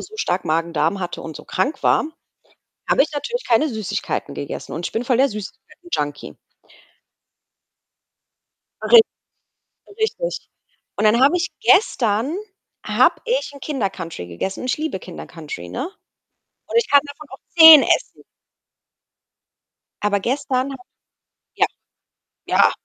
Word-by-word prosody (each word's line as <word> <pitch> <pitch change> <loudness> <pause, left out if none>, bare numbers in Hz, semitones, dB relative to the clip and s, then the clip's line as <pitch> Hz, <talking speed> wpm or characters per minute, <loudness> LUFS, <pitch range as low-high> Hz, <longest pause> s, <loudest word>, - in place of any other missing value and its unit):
so 435 - -11
stark 180 - -2
Magen-Darm 165 +3 0
hatte 180 -2 -5
und 160 -2 -8
so - - -12
krank 290 - -2
war, - - +3 0.9
habe - - +5
ich 310 - -7
natürlich 480 +12 -4
keine 250 +6 +3
Süßigkeiten 210 -3 -4
gegessen 140 - -6
und 165 +3 -4
ich - - -10
bin 235 +2 -3
voll 250 -2 +2
der 275 +1 +4
Süßigkeiten 260 - -10
Junkie. 145 0 -3 2.5
Ri 470 - +8 1.0
richtig. - - -2 0.5
Und 215 - +1
dann 230 +3 +4
habe 285 +6 +5
ich 355 +1 -2
gestern 265 - +2 0.5
habe - - +3
ich - - -1
'n 280 - -12
Kinder 265 -9 -2
Country 165 - -8
gegessen 140 - -5
und 255 - -4
ich - - 0
liebe 310 -11 -3
Kinder 180 - -9
Country, 160 -3 -9
ne? 265 +8 -4 0.8
Und - - 0
ich 465 - +2
kann 285 -1 +6
davon 285 +1 -11
auch 265 - -10 0.2
10 320 -3 +11
essen. - - -1 1.8
Aber 205 -1 +1
gestern 265 +2 -1
habe 265 -2 -10 0.7
ja. - - +3 0.8
Ja. - - +4
255 Hz, 135 wpm, -20 LUFS, 195-310 Hz, 2.5 s, 10